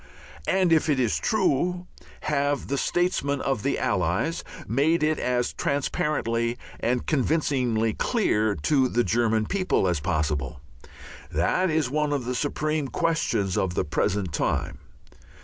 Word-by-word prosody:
And 185 -3 +3
if 160 0 +2
it 140 -3 +2
is 120 -4 +1
true, 180 -3 +1 0.4
have 145 -1 -1
the 140 - 0
statesmen 160 -6 0
of 135 -6 -1
the - - 0
Allies - - 0 0.2
made 150 +8 +2
it 155 0 +1
as 125 -1 0
transparently 120 -4 -1 0.2
and 125 +1 0
convincingly 130 -7 +1
clear 110 - +1
to 135 -4 +3
the 120 -1 +1
German 110 +2 +1
people 185 - +1
as 90 -4 +1
possible? 75 -4 -1 0.7
That 130 - +1
is 155 -5 0
one 150 0 0
of 135 -4 -2
the 125 - -2
supreme 150 +2 -1
questions 150 - 0
of 90 -2 -1
the - - 0
present 90 +2 -1
time. - - -1
135 Hz, 135 wpm, -25 LUFS, 110-155 Hz, 0.7 s, And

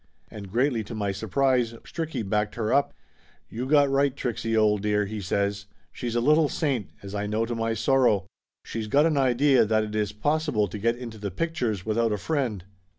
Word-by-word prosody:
And 100 -4 -9
greatly 120 0 +1
to 115 - -7
my 100 -2 -1
surprise, 120 +4 +1
Stricky 160 -10 -4
backed 105 0 0
her 110 -2 -1
up. 140 +1 +3 0.6
"You 120 +3 -4
got 145 0 +5
right, 135 0 +1
Trixie, 115 -2 -2
old 105 -2 +3
dear!" 105 0 +1
he 105 +1 -5
says. 100 +1 -1 0.2
"She's 120 -1 -4
a - - +3
little 150 +4 +4
saint, 135 - -1
as 100 0 -8
I 105 0 -2
know 110 +2 0
to 120 - -4
my 115 -1 -1
sorrow. 120 -5 +2 0.4
She's 110 -1 -4
got 145 +8 +4
an 160 -2 +2
idea 135 0 +4
that 110 0 +2
it 105 0 -6
is 105 -1 0
possible 110 -2 0
to 105 - -6
get 115 +3 +1
into 115 -3 -8
the 100 -1 -3
pictures 115 - -2
without 110 +1 +1
a 105 - 0
friend." 120 - -2
115 Hz, 200 wpm, -26 LUFS, 105-135 Hz, 0.6 s, got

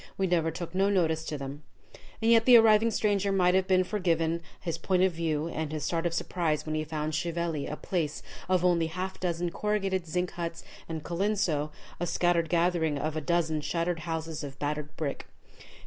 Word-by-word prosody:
We 195 - +1
never 170 -3 +2
took 165 +1 -6
no 195 +2 +2
notice 160 -5 +1
to 150 - -3
them." 140 +1 -6 0.6
And 225 - +4
yet 225 -1 +6
the 250 -2 +9
arriving 225 0 +6
stranger 205 -3 +1
might 180 -2 +3
have 190 0 +2
been 185 -1 +4
forgiven 170 -4 0 0.2
his 165 -2 -4
point 185 +1 +2
of 190 - +4
view 160 -2 -1
and 160 -2 -3
his 155 -2 -3
start 170 +1 0
of 170 - -3
surprise 165 -4 -1
when 155 - -3
he 155 0 0
found 155 0 -3
Chieveley 170 -2 -2
a 150 - -3
place 160 -3 -2 0.3
of 180 -1 +3
only 170 -2 +3
a - - -8
half 185 +3 -4
dozen 175 -1 -1
corrugated 195 -3 -1
zinc 180 +2 -1
huts, 170 -1 -5 0.3
and 160 -2 -4
Colenso 175 -5 0 0.3
a 175 - -1
scattered 170 -1 +1
gathering 170 -3 +2
of 155 +2 -2
a 155 - -1
dozen 160 -1 0
shattered 170 +2 -1
houses 160 -1 -4
of 140 -1 -7
battered 150 +1 -3
brick. 145 -3 -3
170 Hz, 195 wpm, -29 LUFS, 155-185 Hz, 0.6 s, the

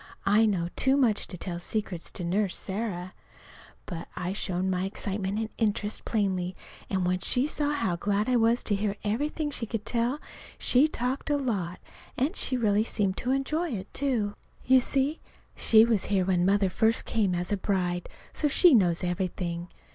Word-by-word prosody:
I 210 +3 +5
know 175 -5 0
too 265 +1 +3
much 235 -7 +2
to 180 - -7
tell 175 0 -5
secrets 180 -2 -4
to 180 - -4
Nurse 190 +2 0
Sarah! 190 -3 -4 0.7
But 170 -3 -6
I 180 +1 -3
showed 185 -2 -2
my 185 0 0
excitement 195 0 -3
and 220 0 -2
interest 210 -1 -1
plainly; 190 -4 -1 0.3
and 190 -2 0
when 180 0 +1
she 250 +8 +2
saw 295 -1 -1
how 190 -12 -1
glad 205 +3 0
I 255 - +2
was 230 +1 +3
to 205 - +1
hear 200 0 -1
everything 295 +8 -1
she 235 -5 -2
could 220 -1 -4
tell, 240 +4 0 0.4
she 265 +5 +4
talked 260 0 -3
a 290 - +2
lot, 200 -10 -2 0.4
and 290 +10 0 0.2
really 215 -4 +2
seemed 200 -4 -1
to 250 - -3
enjoy 305 +6 0
it, 195 -2 -6
too. 240 -7 0 0.3
You 260 0 +6
see, 275 +4 0 0.4
she 220 0 +6
was 225 -4 +1
here 195 -3 +1
when 180 -1 +2
Mother 195 -1 +3
first 220 +4 +2
came 200 -5 +1
as 175 +3 -3
a 205 - +1
bride, 180 -3 -1 0.2
so 300 - 0
she 330 +3 +6
knows 180 -7 +3
everything. 175 -1 -2
205 Hz, 175 wpm, -28 LUFS, 185-245 Hz, 0.7 s, You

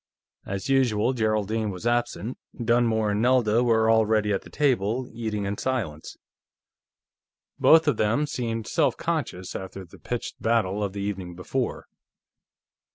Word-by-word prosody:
As 95 -1 -4
usual, 125 -3 +2
Geraldine 110 -1 0
was 95 +2 -7
absent; 120 0 -1 0.2
Dunmore 115 -2 +2
and 105 +1 0
Nelda 120 -2 +3
were 110 -2 +3
already 110 -2 +3
at 95 - -1
the - - -14
table, 125 -3 0
eating 110 -3 -3
in 100 +1 -3
silence. 95 -13 -3 1.4
Both 160 0 +6
of 140 -7 +2
them 115 +8 +2
seemed 115 -6 -3
self - - +1
conscious, 90 0 -3
after 95 0 -6
the 85 - -16
pitched 120 -1 -5
battle 105 -3 +1
of 100 -2 -3
the 100 - -4
evening 95 -3 -4
before. 120 +8 -3
110 Hz, 140 wpm, -25 LUFS, 100-120 Hz, 1.4 s, Both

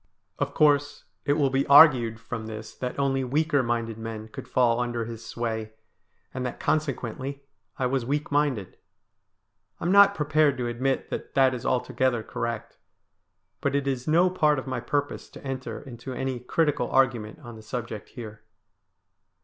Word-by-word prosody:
Of - - -2
course, 145 -1 +3 0.2
it 145 - +3
will 145 -3 +2
be 135 +1 +1
argued 130 -6 +7
from 115 -1 -6
this 110 0 -7
that 125 -1 -5
only 135 -1 +1
weaker 145 +3 +1
minded 115 -2 -2
men 110 -1 -6
could - - -9
fall 120 -2 +2
under 120 -1 -1
his 115 0 -8
sway, 110 -2 -4 0.6
and 130 - -3
that 125 - -4
consequently 140 -2 -2 0.3
I 130 - 0
was 130 0 0
weak 145 +5 -2
minded. 140 -9 0 1.0
I - - -7
am 175 - +2
not 200 0 +7
prepared 150 -2 +2
to 125 - -2
admit 130 +3 -1
that - - -5
that 135 -1 +5
is 125 - -4
altogether 125 -1 +1
correct, 115 0 -5 0.8
but - - 0
it 140 -1 0
is 130 -1 -2
no 175 +4 +4
part 150 -5 +3
of 130 - -4
my 130 -2 -3
purpose 145 +4 -2
to - - -13
enter 130 -1 -4
into 130 -1 -8
any 130 -1 -3
critical 145 0 0
argument 120 -5 +1
on 120 -1 -9
the 110 - -11
subject 110 -1 -6
here. 110 -3 -9
130 Hz, 165 wpm, -26 LUFS, 115-140 Hz, 1.0 s, argued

